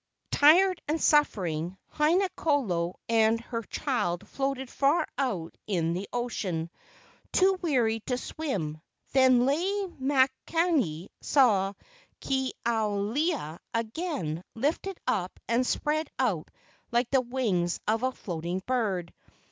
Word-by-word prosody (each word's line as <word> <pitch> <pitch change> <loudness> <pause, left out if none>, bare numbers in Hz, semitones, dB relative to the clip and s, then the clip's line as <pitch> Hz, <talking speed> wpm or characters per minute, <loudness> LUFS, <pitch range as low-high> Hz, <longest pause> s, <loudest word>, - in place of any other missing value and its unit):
Tired 355 +5 +5
and 310 +2 0
suffering, 185 - +2 0.2
Haina 335 +6 +3
kolo 185 - 0
and 225 0 +3
her 230 0 -4
child 205 - -2
floated 270 0 -2
far 280 +6 +2
out 195 -12 -2
in 170 -5 0
the 185 +3 -4
ocean, 190 -9 -2 0.6
too 380 0 +3
weary 245 -9 +2
to 250 - 0
swim. 185 - -4 0.3
Then 260 -2 +5
Lei 285 +6 +2 0.4
makani 265 - +1
saw 205 -8 +3 0.5
Ke 265 -1 0 0.2
ao 220 -3 +1
lewa 220 - -1 0.2
again 230 - -2
lifted 320 +10 -1
up 185 -3 -1
and 245 +2 +2
spread 310 0 0
out 210 -12 0 0.4
like 235 0 +1
the 265 -2 +4
wings 220 -9 0
of 220 +1 +2
a 255 - +2
float¬ 175 -10 -6
ing 180 +2 -2
bird. 205 -9 -1
240 Hz, 120 wpm, -28 LUFS, 185-285 Hz, 0.6 s, Tired